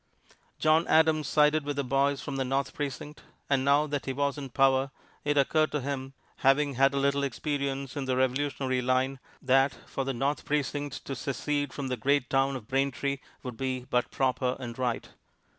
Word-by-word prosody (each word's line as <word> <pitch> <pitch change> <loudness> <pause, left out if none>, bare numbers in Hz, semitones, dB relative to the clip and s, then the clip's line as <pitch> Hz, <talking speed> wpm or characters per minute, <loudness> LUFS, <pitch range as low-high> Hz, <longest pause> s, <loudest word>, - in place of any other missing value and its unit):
John 155 +2 +3
Adams 155 -2 +4
sided 150 +1 +3
with 145 0 -3
the 140 - -1
boys 135 +2 +1
from 140 -1 -5
the 135 - +1
North 135 +1 -1
Precinct, 145 +1 -5 0.3
and 135 -1 +3
now 140 +2 +4
that 145 -2 -3
he 135 - -1
was 140 +1 0
in 140 -2 -6
power 135 +1 +3 0.3
it 145 0 0
occurred 155 +3 +3
to 150 - +1
him, 135 0 -4 0.2
having 140 +1 +3
had 135 +2 +3
a - - 0
little 140 0 +2
experience 140 0 -2
in 140 -2 -3
the 130 -1 0
revolutionary 130 0 0
line, 130 +2 +1 0.2
that 135 +1 +3
for 135 - -3
the 135 - -2
North 135 +4 -1
Precinct 145 -1 -2
to 135 - -4
secede 145 +1 -2
from 140 -2 -4
the 125 - -2
great 140 +2 +1
town 135 0 +2
of 115 -5 -7
Braintree 140 +1 0 0.2
would 125 -3 -6
be 130 -1 -2
but 125 0 +1
proper 130 -1 0
and 120 -1 -7
right. 125 -2 -1
135 Hz, 190 wpm, -28 LUFS, 130-145 Hz, 0.3 s, Adams